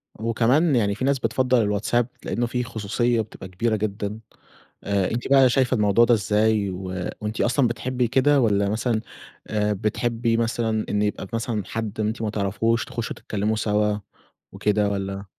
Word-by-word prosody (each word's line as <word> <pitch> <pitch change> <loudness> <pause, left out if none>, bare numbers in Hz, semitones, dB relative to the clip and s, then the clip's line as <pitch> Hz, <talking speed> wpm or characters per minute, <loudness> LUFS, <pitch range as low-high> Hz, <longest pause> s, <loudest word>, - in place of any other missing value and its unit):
وكمان 120 +8 +2
يعني 100 -4 +1
في 120 - -2
ناس 140 -1 +2
بتفضّل 130 -1 +2
الواتساب؛ 105 +3 +1 0.2
لإنه 120 - -1
فيه 125 +1 -2
خصوصية 115 +1 0
بتبقى 105 -3 -9
كبيرة 110 +5 -1
جدًا، 105 0 -3 0.6
آآ 100 -2 0
أنتِ 120 +2 -2
بقى 135 -1 +6
شايفة 130 0 +2
الموضوع 105 +1 +4
ده 120 - +4
إزاي؟ 105 0 +2
و 95 +1 -6 0.4
وأنتِ 105 +1 -3
أصلًا 125 +2 +2
بتحبي 125 +1 -1
كده 135 +4 +3
والّا 100 -3 +2
مثلًا 110 +1 0 0.5
آآ، 105 -1 0
بتحبي 115 +3 0
مثلًا 115 -1 0
إن 105 - 0
يبقى 105 -2 -2
مثلًا 115 -2 -2
حد 110 -1 -5
أنتِ 110 +1 -1
ما 110 - -1
تعرفهوش 105 +3 0
تخشوا 115 -1 -5
تتكلموا 105 +1 -2
سوا 105 -1 +1 0.5
وكده 105 0 +1
والّا؟ 100 0 -4
110 Hz, 160 wpm, -24 LUFS, 105-120 Hz, 0.6 s, بقى